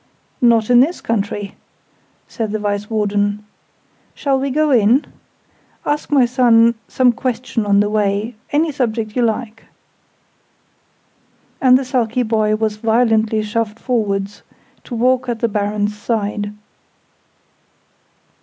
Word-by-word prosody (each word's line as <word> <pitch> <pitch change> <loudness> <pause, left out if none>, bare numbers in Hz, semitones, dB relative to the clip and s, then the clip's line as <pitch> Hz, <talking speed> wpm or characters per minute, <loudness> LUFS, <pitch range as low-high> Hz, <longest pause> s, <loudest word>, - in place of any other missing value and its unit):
"Not 235 -2 +3
in 240 - +7
this 305 +8 +2
country," 205 -2 -3 0.7
said 220 -3 -4
the 215 - -1
Vice 205 0 -3
Warden. 205 -1 -1 0.7
"Shall 275 -2 0
we 275 +1 -2
go 305 +2 +1
in? 240 +3 +4 0.8
Ask 295 0 -2
my 275 -4 +5
son 235 -2 +4
some 255 -1 +3
question 235 -2 -3
on 200 0 +4
the 205 - +1
way 210 +2 0 0.2
any 310 +2 +1
subject 225 -5 -2
you 250 - +1
like!" 225 -1 -2 2.0
And 255 -1 +6
the 265 - -3
sulky 250 -1 0
boy 215 -2 +1
was 215 -1 -2
violently 220 -1 +1
shoved 215 0 -2
forwards, 205 -5 -2 0.4
to 245 - -6
walk 255 +2 +1
at 235 -2 -2
the 235 - +1
Baron's 210 0 -1
side. 205 -1 -2
225 Hz, 125 wpm, -18 LUFS, 210-250 Hz, 2.0 s, in